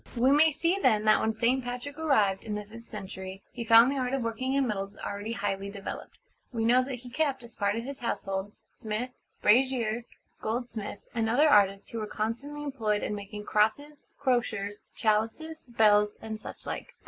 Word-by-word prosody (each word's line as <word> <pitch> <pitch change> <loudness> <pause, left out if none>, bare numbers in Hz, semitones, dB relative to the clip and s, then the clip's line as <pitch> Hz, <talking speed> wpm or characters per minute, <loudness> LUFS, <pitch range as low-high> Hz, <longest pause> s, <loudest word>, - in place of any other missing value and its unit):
We 255 +3 +4
may 300 +3 +6
see 335 +5 0
then 215 - +3
that 215 - +6
when 220 - +1
St. 245 +4 +2
Patrick 250 +5 -5
arrived, 215 -12 +2
in 210 -2 -3
the 210 0 -4
fifth 230 +3 -12
century, 190 -2 -7
he 240 - -5
found 230 +3 +7
the 280 - -1
art 255 +1 0
of 265 - -2
working 230 +3 -2
in 275 -1 +3
metals 200 -3 -3
already 205 +3 -4
highly 200 -1 -2
developed. 200 -1 -7 0.3
We 225 -3 -1
know 250 +2 +5
that 265 0 -4
he 250 - -10
kept, 270 -2 0
as 235 -1 -10
part 200 0 +1
of 230 - -3
his 275 +2 -6
household, 195 -4 -2 0.2
smiths, 225 +4 -4 0.3
brasiers, 240 0 +3 0.3
goldsmiths, 225 -3 -4
and 225 -1 0
other 285 +7 +5
artists, 200 -6 +4
who 230 - -3
were 215 - -3
constantly 240 +9 -3
employed 225 -7 -1
in - - -2
making 210 0 -7
crosses; 285 +9 0
crosiers; 230 -7 0
chalices; 225 +9 0
bells; 210 -3 +4
and 220 -1 -6
such - - -9
like. - - -6
230 Hz, 185 wpm, -29 LUFS, 210-260 Hz, 0.3 s, found